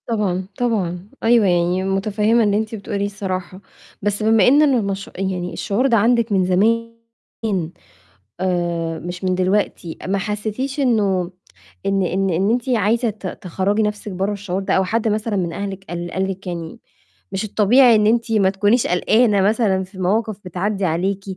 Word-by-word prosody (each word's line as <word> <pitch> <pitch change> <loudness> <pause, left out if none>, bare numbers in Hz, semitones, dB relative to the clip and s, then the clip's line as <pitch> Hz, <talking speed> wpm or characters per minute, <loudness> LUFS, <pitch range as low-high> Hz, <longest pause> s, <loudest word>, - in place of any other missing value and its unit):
طبعًا، 190 -5 -1
طبعًا. 195 -6 -1
أيوه، 230 -2 +4
يعني 175 +1 +1
متفهمة 210 +4 +1
اللي 205 -1 +2
أنتِ 220 +1 -3
بتقوليه 200 -1 -3
الصراحة. 190 -2 -5 0.4
بس 205 +1 -1
بما 220 -2 +4
إنّ 285 +4 +6
المش 205 -9 +1
يعني 185 -2 -3
الشعور 225 +6 0
ده 235 -3 +3
عندِك 230 +1 +2
من 190 -2 +2
زمان 225 +6 +2 1.5
آآ 170 -3 -1
مش 175 +1 -7
من 185 -1 +1
دلوقتي، 185 -2 -1
ما 195 +1 0
حسيتيش 215 +7 -3
إنه 200 -9 +1 0.5
إن 195 0 +1
إن 190 +2 0
إن 185 +4 +1
أنتِ 245 +2 -1
عايزة 230 +1 +2
ت 210 -2 -7 0.2
تخرّجي 195 +4 0
نفسِك 210 0 -3
برّا 190 +3 -1
الشعور 195 -2 -3
ده؟ 195 - -1
أو 190 - +3
حد 225 +4 -1
مثلًا 215 0 -1
من 175 -3 -1
أهلِك 195 +1 -5
قال 175 0 -5
قال 190 +1 -1
لكِ 190 0 -9
يعني 170 +4 -6 0.5
مش 195 +1 -2
الطبيعي، 230 +4 +5
إن 210 -1 +3
أنتِ 230 +1 +1
ما 200 -4 +3
تكونيش 205 +5 +2
قلقانة 210 +3 +3
مثلًا 200 -2 +2
في 190 +1 -14
مواقف 210 +3 0
بتعدّي 195 +3 -2
عليكِ؟ 185 +4 -1
200 Hz, 165 wpm, -20 LUFS, 185-220 Hz, 1.5 s, إنّ